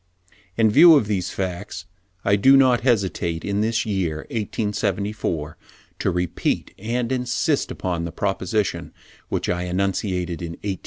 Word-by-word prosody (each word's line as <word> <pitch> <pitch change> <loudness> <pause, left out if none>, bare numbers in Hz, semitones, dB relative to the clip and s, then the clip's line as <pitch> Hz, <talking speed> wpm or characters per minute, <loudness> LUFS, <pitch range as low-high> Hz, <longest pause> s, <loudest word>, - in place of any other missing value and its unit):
In 110 -2 +4
view 160 +6 +8
of 140 - +3
these 95 -4 -1
facts 95 +1 -5 0.4
I 100 - +4
do 135 +7 +6
not 130 -3 +4
hesitate 95 -8 0
in 100 0 0
this 115 +1 0
year 90 -7 -2
1874, 105 -7 -2 0.4
to - - +1
repeat 90 -1 -1
and 115 +4 -2
insist 125 +3 0
upon 85 -2 -3
the 85 - -5
proposition 95 +2 -2 0.4
which - - -2
I 90 0 -1
enunciated 90 -1 -1
in 85 -1 -5
1863: - - -1
(74. 95 - -5
100 Hz, 145 wpm, -22 LUFS, 90-115 Hz, 0.4 s, view